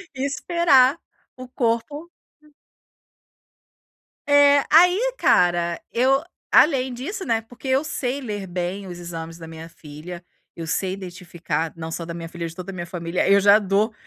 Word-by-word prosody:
e 265 +1 -2
esperar 280 -2 +3 0.4
o 255 0 -9
corpo 250 +7 -2 0.3
eh 300 -1 -23 1.7
É. 285 -1 +5
Aí 360 +10 +5
cara, 175 -1 +2
eu, 265 +4 +2 0.3
além 265 -4 +4
disso, 375 - -6
né, 225 -1 0
porque 245 +4 -12
eu 265 +2 +2
sei 275 -2 -3
ler 205 -6 -5
bem 180 +2 -4
os 175 -1 -8
exames 165 -1 -7
da 165 -1 -10
minha 160 0 -10
filha, 165 +2 -11 0.3
eu 165 - -6
sei 185 +3 -1
identificar, 175 -4 -5
não 160 -1 -7
só 170 +1 -5
da 170 - -6
minha 165 -1 -7
filha, 170 0 -5
de 165 - -10
toda 185 +2 -7
a - - -10
minha 175 -2 -5
família, 170 0 -2
eu 200 0 +6
já 200 +1 +6
dou 205 +2 0
200 Hz, 160 wpm, -22 LUFS, 170-265 Hz, 1.7 s, eu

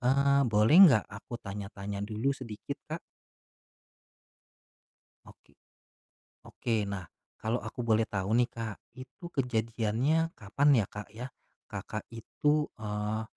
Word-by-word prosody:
eee, 140 +2 +4
boleh 110 +7 +5
nggak 110 -8 +4
aku 100 +4 -7
tanya-tanya 100 0 -6
dulu 110 +6 0
sedikit, 115 -6 -7
Kak? - - -3 2.3
Oke, - - -23 0.9
oke, 115 - -3
nah, 100 -4 -4 0.3
kalau 110 0 -1
aku 110 +3 -6
boleh 110 -1 +4
tahu 100 +2 -1
nih, 120 0 +4
Kak, 115 -4 -5 0.2
itu 130 +7 -12
kejadiannya 125 +4 0
kapan 110 +8 +1
ya, - - -4
Kak, 105 0 -7
ya, 120 +3 -5 0.4
Kakak, 110 - -5
itu, 150 +6 0
eee, 105 0 -3
110 Hz, 115 wpm, -30 LUFS, 105-130 Hz, 2.3 s, boleh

